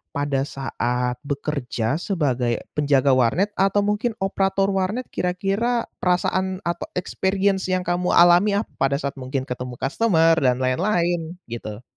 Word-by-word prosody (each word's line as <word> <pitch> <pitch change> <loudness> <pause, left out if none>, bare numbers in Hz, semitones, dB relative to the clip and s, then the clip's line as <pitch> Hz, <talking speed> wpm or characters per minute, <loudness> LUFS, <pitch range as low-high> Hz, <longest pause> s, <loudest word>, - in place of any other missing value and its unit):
pada 145 -1 -1
saat 125 -2 -2
bekerja 140 -2 -2
sebagai 130 - -1
penjaga 140 -2 +2
warnet 130 - +2
atau 195 +1 +3
mungkin 210 +3 -1
operator 195 0 +1
warnet 195 +6 -2
kira-kira 195 +7 0 0.2
perasaan 185 +1 0
atau 170 0 -3
experience 190 +1 0
yang 185 -1 0
kamu 180 0 0
alami 175 +4 +6
ap 205 - +1 0.2
pada 135 0 +2
saat 140 -1 -2
mungkin 130 +1 -3
ketemu 125 -1 -6
customer 165 - +2
dan 125 -4 +3
lain-lain 170 +3 0 0.2
gitu? 110 -1 -6
170 Hz, 130 wpm, -22 LUFS, 135-195 Hz, 0.2 s, alami